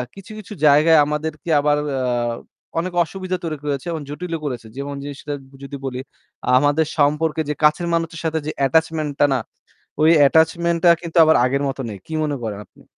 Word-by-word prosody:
কিছু, 195 +2 -12
কিছু 210 +1 -10
জায়গায় 155 +3 +6
আমাদেরকে 155 +1 -4
আবার 145 0 +2 0.3
আ - - -1 0.8
অনেক 180 +1 -3
অসুবিধা 185 +1 -4
তৈরি 155 -2 -3
করেছে 145 +2 -3
এবং 160 -2 -4
জটিলও 165 +2 -5
করেছে। 120 -5 -5
যেমন 140 0 -5
জিনিসটা 145 +1 -6 0.3
যদি 140 +1 -7
বলি, 125 -1 -4 0.6
আমাদের 145 +3 +2
সম্পর্কে 150 +2 +1
যে - - +1
কাছের 155 +3 +3
মানুষদের 165 -1 -2
সাথে 160 0 0
যে - - -1
attachment 160 0 +1
টা 145 - +6
না? 130 - +1 0.6
ওই 160 +2 +6 0.2
attachment 170 +2 +2
টা - - +8
কিন্তু 170 0 -5
আবার 160 - +5
আগের 140 +2 0
মত 135 - -4
নেই। 100 - -7
কি 160 - -7
মনে 145 -2 -1
করেন 105 -2 -4
আপনি? - - -22
155 Hz, 180 wpm, -20 LUFS, 145-165 Hz, 0.8 s, টা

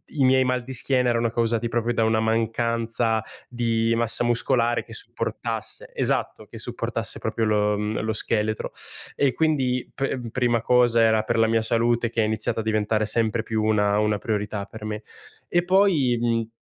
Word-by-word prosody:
i 140 - +2
miei 130 0 +5
mal 125 0 0
di 130 +2 -7
schiena 125 0 +1
erano 115 -1 +1
causati 115 0 0
proprio 120 0 0
da 115 - +1
una 110 0 +2
mancanza 115 0 0 0.3
di 115 -2 0
massa 115 +1 0
muscolare 120 0 +1
che - - -13
supportass - - -4
esatto! - - -1
Che - - -11
supportasse - - -3
proprio 115 - -1
lo, 105 -1 +2
uhm, 105 +1 -2
lo 110 0 -1
scheletro 110 0 -1 0.4
e 140 -2 +2
quindi 130 -5 0
p 130 -3 -3
prima 120 -1 +1
cosa 120 -1 +4
era 110 -1 +3
per 115 +1 -1
la 115 - +4
mia 115 0 +2
salute 115 +1 +1
che 115 - 0
ha - - +2
iniziato 110 +1 0
a - - -2
diventare 110 0 +1
sempre 110 +1 0
più 110 -1 -1
una 105 -1 +2
una 105 -1 +1
priorità 105 -3 -2
per 110 -1 -11
me. 105 0 -4 0.4
E 175 0 +1
poi, 175 -10 +3
mhmm, 115 -1 0
115 Hz, 175 wpm, -24 LUFS, 110-120 Hz, 0.4 s, miei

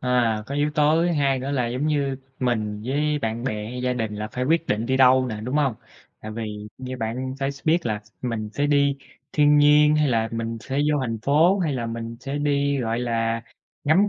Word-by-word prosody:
À, 120 -4 +1
có 140 - -5
yếu 145 +1 +1
tố 150 +2 +3
thứ 175 0 +1
hai 140 -4 +2
nữa 130 +2 -4
là 130 -4 0
giống 125 +5 -2
như 140 -3 0 0.2
mình 110 -4 -1
với 150 +3 0
bạn 115 -2 -3
bè 105 -5 -2
hay 125 0 -5
gia 125 0 +1
đình 110 -4 -3
là 105 +1 -4
phải 125 +3 -3
quyết 165 +4 +2
định 110 +2 -1
đi 130 +1 +1
đâu 130 0 +5
nè, 110 -3 -4
đúng 130 +4 -1
hông? 140 -5 +2 0.5
Tại 110 - -7
vì 105 -1 -5
như 130 0 -5
bạn 125 +3 -3
phải 135 +1 0
s 140 - -16
biết 165 0 +2
là 105 -2 -1 0.2
mình 115 -4 -3
sẽ 145 - +1
đi 140 -1 +3 0.4
thiên 150 0 +5
nhiên, 150 +1 +6
hay 150 -1 +3
là 115 -2 +1
mình 115 0 -3
sẽ 135 +3 -5 0.2
vô 145 - +1
thành 115 -3 -2
phố, 160 +9 +4
hay 165 -6 0
là 120 -3 -2
mình 115 0 -5
sẽ 140 +1 -4
đi, 140 -1 +1
gọi 115 -1 -1
là, 115 -1 -1 0.4
ngắm 180 +8 +4
130 Hz, 230 wpm, -24 LUFS, 115-145 Hz, 0.5 s, nhiên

